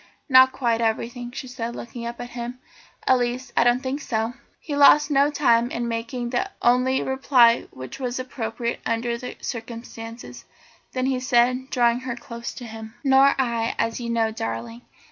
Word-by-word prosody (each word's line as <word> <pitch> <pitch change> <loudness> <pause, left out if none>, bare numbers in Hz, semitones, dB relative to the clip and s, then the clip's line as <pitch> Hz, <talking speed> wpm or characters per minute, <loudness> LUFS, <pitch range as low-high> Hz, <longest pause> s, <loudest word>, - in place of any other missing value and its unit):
"Not 260 -2 +7
quite 235 -4 0
everything," 235 +2 -2
she 260 +1 -7
said, 240 -2 -5
looking 235 0 -7
up 235 0 -7
at 245 0 -7
him 240 +1 -6 0.5
"at 260 -1 +4
least 245 +1 -3
I - - +5
don't 245 +2 +2
think 270 +3 -3
so." 225 -2 -2 0.3
He 295 - -5
lost 290 +1 +6
no 280 +1 +4
time 240 -5 +3
in 240 -1 -3
making 240 +1 -3
the 260 +10 0
only 255 +2 +3
reply 260 -3 +4
which 130 - -9
was 250 -2 -3
appropriate 235 -2 -4
under 235 +1 -1
the 250 +1 -7
circumstances; 230 0 -7
and - - -30
then 255 0 -1
he 260 -1 0
said, 255 +1 +2
drawing 240 -1 +2
her 255 -2 -4
close 235 -1 -7
to 245 - -9
him: 220 0 -9
"Nor 270 0 +5
I, 235 -3 0
as 230 +1 -1
you 235 -1 -4
know, 225 -1 +1
darling. 115 - -5
240 Hz, 180 wpm, -24 LUFS, 230-260 Hz, 0.5 s, Not